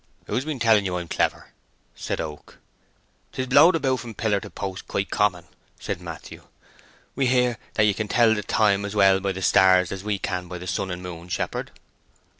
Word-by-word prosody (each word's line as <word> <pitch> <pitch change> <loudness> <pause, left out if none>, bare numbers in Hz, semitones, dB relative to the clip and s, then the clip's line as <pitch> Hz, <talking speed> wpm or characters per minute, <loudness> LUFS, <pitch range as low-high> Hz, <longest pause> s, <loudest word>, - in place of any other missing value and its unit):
"Who's 130 - -2
been 155 -3 -3
telling 110 -4 +4
you 90 -2 -2
I'm 85 -1 -5
clever?" - - -1 0.4
said - - -4
Oak. 75 -2 -7 0.8
"'Tis 130 - -2
blowed 145 +7 +6
about 135 -5 0
from 115 -3 -8
pillar 105 -1 0
to - - -10
post 95 -1 -6
quite 95 - -2
common," 90 -4 +1 0.3
said - - -4
Matthew. - - -9 0.7
"We 135 -1 0
hear 125 -2 +2 0.2
that 105 - +3
ye 105 - +3
can 110 +1 -3
tell 115 0 +4
the 105 - -2
time 100 0 +2
as 100 +1 -5
well 95 -2 +5
by 100 0 -1
the 95 0 -5
stars 95 -1 +4
as 95 -1 -5
we 105 -1 -1
can 90 -1 -4
by 90 0 -6
the 90 - -9
sun 95 +1 -2
and 90 0 -5
moon, 85 -1 -8
shepherd." - - -3
100 Hz, 200 wpm, -24 LUFS, 95-115 Hz, 0.8 s, blowed